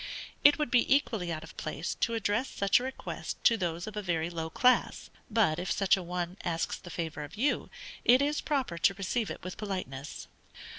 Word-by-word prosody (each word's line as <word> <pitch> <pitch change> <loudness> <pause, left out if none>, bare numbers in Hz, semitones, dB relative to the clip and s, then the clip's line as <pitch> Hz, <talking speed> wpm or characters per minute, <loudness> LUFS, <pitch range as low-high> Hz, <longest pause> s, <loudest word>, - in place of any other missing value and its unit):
It 290 - +8
would 300 -5 -1
be 245 0 +3
equally 215 -11 -1
out 155 -1 -4
of - - -12
place - - -3
to 230 - 0
address 225 +4 0
such 200 +2 +3
a - - -5
request 265 +1 -5
to 230 - +6
those 175 -4 -2
of 215 - -7
a 210 - -2
very 170 -3 -1
low 165 -1 -3
class; 250 +9 +2 0.2
but 210 -9 +2
if 180 - -3
such 195 -2 +4
an 185 -3 -6
one 180 +1 -3
asks 165 -3 -1
the 175 - -11
favor 165 -3 -4
of 145 +6 -9
you, 275 +6 +1 0.3
it 250 +2 +6
is 290 +2 +1
proper 260 - -1
to 195 +3 +3
receive 200 +3 -1
it - - -7
with 185 +1 -6
politeness. 185 -10 -5
195 Hz, 205 wpm, -30 LUFS, 170-235 Hz, 0.3 s, It